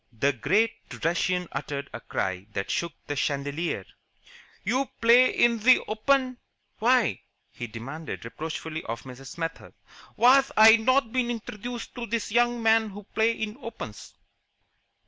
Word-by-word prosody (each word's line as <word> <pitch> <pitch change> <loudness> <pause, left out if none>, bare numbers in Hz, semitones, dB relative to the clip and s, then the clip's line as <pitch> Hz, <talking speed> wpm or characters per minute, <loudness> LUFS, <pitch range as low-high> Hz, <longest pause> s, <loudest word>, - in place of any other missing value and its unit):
The 135 +5 +1
great 210 - +2 0.3
Russian 180 +1 0
uttered 140 0 -4
a 115 - -5
cry 95 +1 -3
that 100 -1 -3
shook 170 -2 -2
the 145 - -3
chandelier. 145 +4 -2 0.8
"You 265 +2 0
play 240 +2 +6
in 235 -1 +2
ze 250 +4 +6
Open? 255 +3 +1 0.4
Why," 245 +2 +2 0.3
he 120 - -6
demanded 135 +7 -7
reproachfully 160 +4 -5
of 115 +1 -5
Mrs. 130 0 -10
Smethurst, 165 -1 -6 0.4
"was 265 +3 +5
I 220 +1 +9
not 255 +1 +2
been 250 -1 0
introducted 235 +1 -6
to 240 -1 -6
this 225 -1 -2
young 240 +1 +2
man 225 -1 +4
who 205 +1 -10
play 220 +1 +3
in 220 0 -5
opens?" 225 - -8
215 Hz, 140 wpm, -26 LUFS, 145-240 Hz, 0.8 s, I